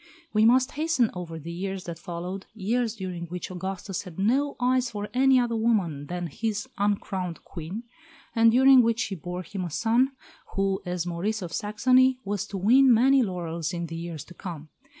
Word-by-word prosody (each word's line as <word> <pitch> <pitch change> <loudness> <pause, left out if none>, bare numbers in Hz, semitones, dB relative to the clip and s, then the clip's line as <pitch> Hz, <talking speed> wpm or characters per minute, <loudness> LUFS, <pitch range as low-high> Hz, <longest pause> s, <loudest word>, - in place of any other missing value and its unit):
We 215 0 +4
must 255 +2 +4
hasten 300 -7 +1
over 170 -2 -6
the 160 +2 -7
years 190 +2 -4
that 170 -1 -7
followed 180 +2 -6
years 225 +2 0
during 180 -4 -5
which 180 +2 -6
Augustus 190 +1 -4
had 180 -5 -11
no 265 +9 +1
eyes 255 0 +2
for 210 -2 -5
any 265 +1 +5
other 240 -1 0
woman 195 -11 0
than 175 +1 -3
his 215 - -3
"uncrowned 190 -4 -1
Queen," 175 +8 -7 0.5
and 230 0 +6
during 265 +2 +7
which 230 -1 +1
she 200 - -2
bore 180 +1 -5
him 190 +2 -5
a 175 - -3
son 235 - +2 0.4
who, 195 0 0
as 180 -1 -2
Maurice 185 +5 -2
of 170 - -6
Saxony, 255 +5 +3
was 205 0 -2
to 200 - -5
win 250 +7 +5
many 260 +4 +5
laurels 170 -6 -3
in 170 0 -3
the 165 0 -7
years 165 -3 -6
to 175 - -13
come. 160 -4 -8
195 Hz, 185 wpm, -26 LUFS, 175-235 Hz, 0.5 s, during